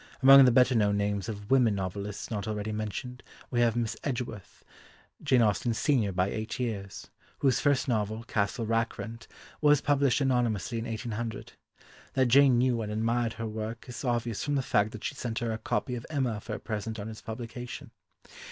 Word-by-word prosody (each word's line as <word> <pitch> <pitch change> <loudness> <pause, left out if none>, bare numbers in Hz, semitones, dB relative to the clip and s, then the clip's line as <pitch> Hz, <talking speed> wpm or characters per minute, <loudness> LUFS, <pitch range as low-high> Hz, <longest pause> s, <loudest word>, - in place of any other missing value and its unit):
Among 135 0 +10
the 125 - +5
better 125 +1 +5
known 105 -3 +2
names 100 -1 -1
of 105 0 -7
women 125 -6 +4
novelists 100 +3 -5
not 105 -1 -3
already 105 0 -3
mentioned 110 +4 -5 0.3
we 120 -2 +2
have 115 -1 +3
Miss 115 -1 -1
Edgeworth, 120 -7 -5 0.6
Jane 130 -6 +4
Austen's 110 +2 +1
senior 125 -9 +2
by 90 +1 +1
eight 110 +2 -4
years, 105 -6 -4 0.3
whose 130 -3 +2
first 145 -2 +2
novel, 110 -2 -1
Castle 115 +2 -1
Rackrent, 115 0 -2 0.3
was 150 -1 +5
published 140 -2 +2
anonymously 120 -5 0
in 115 - -4
1800. 115 -1 -5 0.6
That 130 -1 +3
Jane 135 0 +6
knew 120 -1 +2
and 105 -1 -4
admired 115 +2 0
her 115 - -5
work 110 +1 -5
is 125 +1 -7
obvious 120 -3 -1
from 145 -1 -1
the 135 - +1
fact 105 -3 +1
that 110 - -8
she - - -2
sent 120 -4 -4
her 120 -1 -1
a 110 - -3
copy 125 - -2
of 120 -1 -5
Emma 130 -8 -1
for 105 - -5
a - - -6
present 110 0 -4
on 100 - -5
its 110 -1 -8
publication. 120 +2 -7
115 Hz, 185 wpm, -29 LUFS, 110-125 Hz, 0.6 s, Among